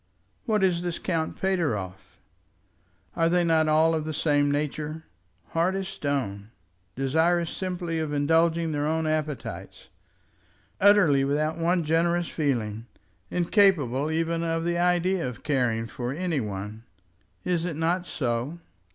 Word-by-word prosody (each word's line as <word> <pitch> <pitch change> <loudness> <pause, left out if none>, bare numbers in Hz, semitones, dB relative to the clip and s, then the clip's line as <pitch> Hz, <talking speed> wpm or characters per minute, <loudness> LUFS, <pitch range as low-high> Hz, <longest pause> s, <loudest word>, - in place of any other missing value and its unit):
What 215 -4 +1
is 175 -2 +2
this 175 -1 -3
Count 165 -3 -2
Pateroff? 115 - -2 1.0
Are 165 -1 +2
they 175 +1 +3
not 160 -2 +3
all 160 +1 +4
of 160 -1 -1
the 155 0 -4
same 145 -2 +2
nature; 150 +2 -3 0.5
hard 170 +3 +1
as 195 -1 -3
stone, 130 - -3 0.5
desirous 160 +6 +1
simply 180 -3 -3
of 155 -2 -2
indulging 165 +3 +2
their 145 0 -1
own 160 +1 0
appetites, 155 -2 -4 0.9
utterly 190 -9 +5
without 155 +4 0
one 170 +1 +2
generous 170 +2 +1
feeling, 115 -7 -2 0.4
incapable 170 - +2
even 165 +1 0
of 165 0 -1
the 170 0 0
idea 180 -2 +1
of 125 - -11
caring 125 -6 0
for 120 +1 -5
any 165 0 -1
one? 105 0 -5 0.6
Is 175 -2 0
it 175 -3 -3
not 175 +3 0
so? 125 +4 -2
160 Hz, 135 wpm, -26 LUFS, 145-175 Hz, 1.0 s, utterly